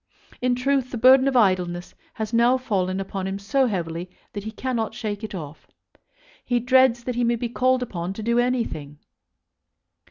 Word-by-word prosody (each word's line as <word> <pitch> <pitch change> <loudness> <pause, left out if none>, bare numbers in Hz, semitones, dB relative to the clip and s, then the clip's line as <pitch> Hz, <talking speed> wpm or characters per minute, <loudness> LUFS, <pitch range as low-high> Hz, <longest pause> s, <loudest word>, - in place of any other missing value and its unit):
In 250 0 +2
truth 265 0 0
the 245 - -5
burden 260 +3 +6
of 265 -2 +2
idleness 180 -5 +1 0.2
has 220 +1 -4
now 240 +2 +4
fallen 195 -7 -1
upon 195 0 -4
him 195 +1 -3
so 235 +7 +1
heavily 175 -3 -3 0.2
that 205 0 -6
he - - -3
cannot 225 -1 -3
shake 215 -3 -4
it 215 - -5
off. 155 -3 -9 0.8
He 245 -1 +1
dreads 245 -1 +4
that 250 - -3
he 240 +1 0
may 235 0 +2
be 235 +1 -3
called 255 +1 +2
upon 180 -5 -4
to 215 - -7
do 235 +2 +2
anything. 230 - -2
230 Hz, 180 wpm, -24 LUFS, 190-250 Hz, 0.8 s, burden